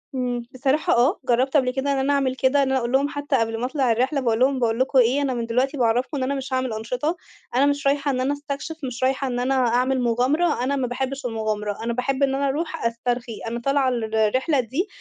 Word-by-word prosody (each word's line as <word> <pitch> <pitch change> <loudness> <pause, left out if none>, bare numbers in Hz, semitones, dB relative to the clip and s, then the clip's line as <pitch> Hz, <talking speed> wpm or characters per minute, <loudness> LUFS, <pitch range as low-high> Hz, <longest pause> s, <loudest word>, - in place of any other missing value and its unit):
إمم، 245 -2 -2
بصراحة 270 +4 +1
آه، 270 - +3
جرّبت 260 +5 +3
قبل 255 -2 +2
كده 275 +2 -1
إن 275 - +1
أنا 275 +2 +1
أعمل 265 -2 +1
كده، 275 +2 +2
إن 265 - 0
أنا 265 - +2
أقول 235 0 -3
لهُم 280 +2 +2
حتى 285 -1 -2
قبل 225 -1 0
ما 245 - -1
أطلع 260 -3 +1
الرحلة 260 +5 +1
باقول 230 -2 +1
لهُم 265 0 +3
باقول 230 0 0
لكم 260 0 +3
إيه، 250 +4 +3
أنا 270 -2 0
من 235 -1 -2
دلوقتي 260 +5 0
باعَرّفكم 245 +5 +1
إن 260 - -1
أنا 280 +2 -1
مش 265 -1 -5
هاعمل 255 -3 -1
أنشطة 250 +9 -2 0.4
أنا 275 +2 +4
مش 285 0 0
رايحة 280 0 +1
إن 255 - -2
أنا 275 +2 +1
أستكشف، 285 +2 -5
مش 255 0 -4
رايحة 265 +1 +1
إن 245 -1 -2
أنا 260 +2 0
أعمل 255 +1 +2
مُغامرة، 250 +5 +1
أنا 280 +2 0
ما 260 -2 -1
باحبش 265 +2 -4
المُغامرة، 215 -2 -3
أنا 235 0 -1
باحب 265 +3 -1
إن 270 0 +2
أنا 280 0 0
أروح 315 0 -3
أسترخي. 235 0 -2
أنا 235 +1 -3
طالعة 275 +1 +1
الرحلة 235 +5 +1
دي 270 - -1
260 Hz, 235 wpm, -23 LUFS, 240-275 Hz, 0.4 s, أنا